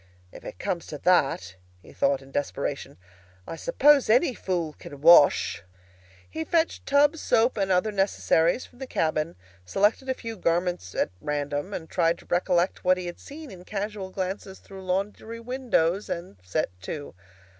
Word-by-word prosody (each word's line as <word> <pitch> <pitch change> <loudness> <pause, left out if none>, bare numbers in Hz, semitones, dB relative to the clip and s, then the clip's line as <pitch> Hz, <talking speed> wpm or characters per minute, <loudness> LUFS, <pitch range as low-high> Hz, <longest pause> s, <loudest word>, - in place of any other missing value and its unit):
"If - - -12
it - - -8
comes 170 - -3
to 150 - -6
that," 135 - +1 0.3
he - - -15
thought 140 -1 +1
in 135 - -16
desperation, 145 - -3 0.5
"I - - -6
suppose 275 - +4
any 255 +5 +4
fool 175 -7 -2
can 145 - -10
wash!" 155 - +6 0.7
He 160 - -4
fetched 330 - 0
tub, 290 +3 +4
soap, 240 -4 +2
and 195 -3 0
other 185 +4 +2
necessaries 195 0 +2
from 245 - -20
the 265 - -6
cabin, 155 -5 -1 0.3
selected 205 - +1
a 260 - +1
few 230 -2 -7
garments 175 - -1
at - - 0
random, 145 +4 -3
tried 165 0 +1
to - - -17
recollect 175 0 +1
what 185 0 +4
he 180 - -5
had 175 0 -6
seen 295 0 -10
in 180 -1 -11
casual 200 0 -4
glances 190 +1 -4
through 190 -1 -12
laundry 205 +5 -2
windows, 230 -7 0
and 170 - -5
set 90 -2 -1
to. 145 +9 -6
185 Hz, 160 wpm, -26 LUFS, 160-220 Hz, 0.7 s, wash